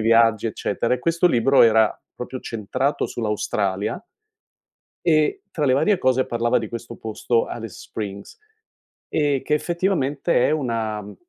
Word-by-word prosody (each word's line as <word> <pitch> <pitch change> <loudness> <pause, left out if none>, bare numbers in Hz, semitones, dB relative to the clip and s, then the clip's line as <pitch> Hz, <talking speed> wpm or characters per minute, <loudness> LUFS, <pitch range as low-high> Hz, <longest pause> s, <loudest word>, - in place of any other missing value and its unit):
viaggi, 115 0 +4
eccetera 115 +2 -2
e 125 - +2
questo 170 +1 +2
libro 135 -2 +4
era 110 -2 +4 0.2
proprio 130 +1 -6
centrato 125 +6 -2
sull'Australia 105 - -2 1.0
e 160 - +2
tra 150 - -2
le 130 - +3
varie 180 +9 +3
cose 130 0 +2
parlava 120 0 +1
di 110 - -5
questo 115 +1 -7
posto, 115 +1 -1
Alice 115 -2 -7
Springs, 100 -2 -7 0.7
e 145 -3 +1
che 150 - 0
effettivamente 170 -5 +1
è - - +1
una, 115 -7 -1
mhmm, 105 0 -11
120 Hz, 140 wpm, -22 LUFS, 110-145 Hz, 1.0 s, viaggi